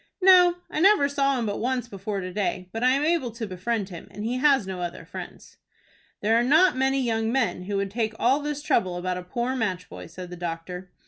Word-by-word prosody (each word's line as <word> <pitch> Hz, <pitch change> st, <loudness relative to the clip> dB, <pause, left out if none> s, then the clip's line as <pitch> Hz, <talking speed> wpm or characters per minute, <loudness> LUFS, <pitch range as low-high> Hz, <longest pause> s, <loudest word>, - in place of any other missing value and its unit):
"No, 365 Hz, -2 st, +7 dB, 0.2 s
I -, -, -2 dB
never 370 Hz, -5 st, +5 dB
saw 275 Hz, -1 st, +1 dB
him 235 Hz, -, -1 dB
but 205 Hz, -1 st, -2 dB
once 250 Hz, 0 st, -1 dB
before 200 Hz, -1 st, -4 dB
to 185 Hz, 0 st, -6 dB
day, 185 Hz, -2 st, -2 dB
but 225 Hz, +3 st, -4 dB
I 255 Hz, -, +5 dB
am 280 Hz, +2 st, +1 dB
able 320 Hz, -6 st, +1 dB
to 230 Hz, -1 st, -5 dB
befriend 200 Hz, +2 st, -3 dB
him, 175 Hz, -3 st, -9 dB
and 210 Hz, -, -7 dB
he 245 Hz, +2 st, -1 dB
has 270 Hz, -4 st, +4 dB
no 185 Hz, -1 st, -5 dB
other 175 Hz, -1 st, -5 dB
friends." -, -, -10 dB, 0.6 s
"There 220 Hz, +2 st, +3 dB
are 235 Hz, -, +4 dB
not 315 Hz, +8 st, +5 dB
many 265 Hz, +1 st, +1 dB
young 225 Hz, -3 st, 0 dB
men 235 Hz, -8 st, 0 dB
who 200 Hz, +1 st, -2 dB
would 195 Hz, -1 st, -2 dB
take 220 Hz, 0 st, -2 dB
all 260 Hz, +4 st, +3 dB
this 295 Hz, 0 st, -4 dB
trouble 185 Hz, -11 st, +1 dB
about 180 Hz, 0 st, -2 dB
a -, -, -8 dB
poor 240 Hz, +8 st, -2 dB
match 185 Hz, -7 st, -2 dB
boy," -, -, -9 dB
said 180 Hz, +1 st, -9 dB
the -, -, -6 dB
doctor. 175 Hz, +2 st, -6 dB
225 Hz, 235 wpm, -25 LUFS, 185-270 Hz, 0.6 s, No